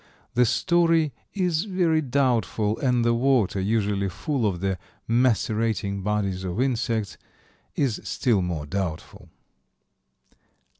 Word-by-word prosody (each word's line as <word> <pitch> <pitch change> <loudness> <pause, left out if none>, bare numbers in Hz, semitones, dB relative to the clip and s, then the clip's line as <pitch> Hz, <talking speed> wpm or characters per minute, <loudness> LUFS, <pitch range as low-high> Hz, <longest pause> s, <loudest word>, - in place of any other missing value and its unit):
The 125 0 +4
story 165 - +2 0.2
is 180 -2 0
very 175 -5 +1
doubtful, 120 -6 0
and 125 -3 +1
the 120 - +3
water, 120 -5 +2
usually 100 -1 0
full 130 - -1
of 90 -4 -2
the 95 -1 -1 0.3
macerating 110 -4 +1
bodies 100 -2 -1
of 90 +3 -3
insects, 115 -5 -1 0.6
is 130 -7 0
still 115 -6 +1
more 85 -4 -3
doubtful. 90 -1 -5
115 Hz, 110 wpm, -25 LUFS, 100-135 Hz, 0.6 s, The